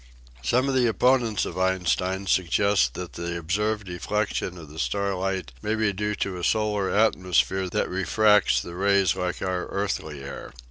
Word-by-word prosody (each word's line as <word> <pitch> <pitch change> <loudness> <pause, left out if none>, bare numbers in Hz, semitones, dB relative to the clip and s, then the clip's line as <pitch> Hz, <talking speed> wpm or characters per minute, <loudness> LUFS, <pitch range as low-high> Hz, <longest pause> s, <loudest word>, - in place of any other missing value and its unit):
Some 125 - +1
of 135 - 0
the 125 -2 +3
opponents 115 0 +2
of - - -5
Einstein 95 +1 0
suggest 95 - +2
that 90 -1 -6
the 85 0 -4
observed 105 +5 -1
deflection 90 +1 -2
of 80 -3 -10
the 75 +2 -10
starlight 95 -4 -1
may 105 +1 -1
be 110 -2 +1
due 105 +2 -2
to 95 -3 -3
a - - -7
solar 105 0 +1
atmosphere 95 -3 +2
that - - 0
refracts 105 +2 +3
the 85 - -7
rays 100 -1 +2
like 90 -1 -3
our 90 -1 -2
earthly 80 -8 -3
air. 70 - -8
95 Hz, 165 wpm, -25 LUFS, 90-105 Hz, -, the